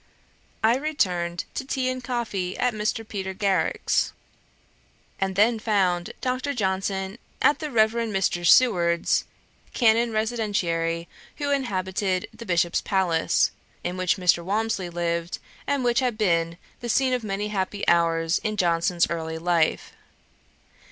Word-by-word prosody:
I 230 +3 +4
returned 180 - -1
to - - -3
tea 265 -1 -1
and 255 0 -2
coffee 225 -7 -3
at 250 -1 +1
Mr. 215 +1 -2
Peter 190 -3 -4
Garrick's, 195 -2 +1 1.1
and 190 -1 -1
then 220 +3 +3
found 185 -5 +1
Dr. 260 +2 -1
Johnson 190 0 -2 0.2
at 295 - +3
the 305 - -4
Reverend 230 -1 +2
Mr. 190 -3 0
Seward's, 175 -4 +4 0.5
Canon 230 -1 +3
Residentiary, 195 -7 -1 0.3
who 285 -1 -1
inhabited 190 -7 -1
the 230 - -10
Bishop's 175 -1 +1
palace, 180 -4 +1 0.3
in 175 +1 -3
which 185 0 +1
Mr. 180 -2 +3
Walmsley 200 -1 -1
lived, 170 0 -2 0.3
and 280 -2 0
which 240 0 +3
had 250 -4 0
been 170 -5 +1 0.2
the 240 - -5
scene 260 +3 +2
of 250 -2 -1
many 205 0 -2
happy 200 0 -2
hours 165 0 +3
in 215 -1 -3
Johnson's 170 -1 +2
early 160 -1 -3
life. 165 -1 0
195 Hz, 130 wpm, -25 LUFS, 175-230 Hz, 1.1 s, I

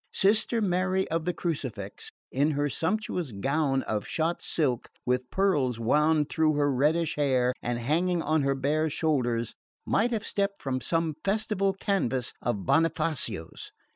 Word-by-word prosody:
Sister 220 +3 +3
Mary 185 0 +1
of 165 -1 -1
the 180 - +1
Crucifix, 130 - -4 0.2
in 140 +4 +2
her 145 -1 0
sumptuous 180 - -2
gown 135 +5 0
of 105 -2 -3
shot 165 +2 -1
silk, 130 -7 0 0.2
with 125 0 0
pearls 145 - +1
wound 150 +5 +3
through 155 -1 +1
her 145 -1 +2
reddish 155 +5 +1
hair 130 -4 +2
and 120 0 -2
hanging 165 +8 0
on 155 0 +2
her 135 0 +1
bare 150 +4 0
shoulders, 125 -7 0 0.3
might 230 +4 +2
have 225 -4 -2
stepped 200 0 -1
from 130 -2 -2
some 165 +5 0
festal 195 -1 +1
canvas 150 - -1
of 105 -6 -2
Bonifazio's. 160 - 0
155 Hz, 145 wpm, -28 LUFS, 130-180 Hz, 0.3 s, Sister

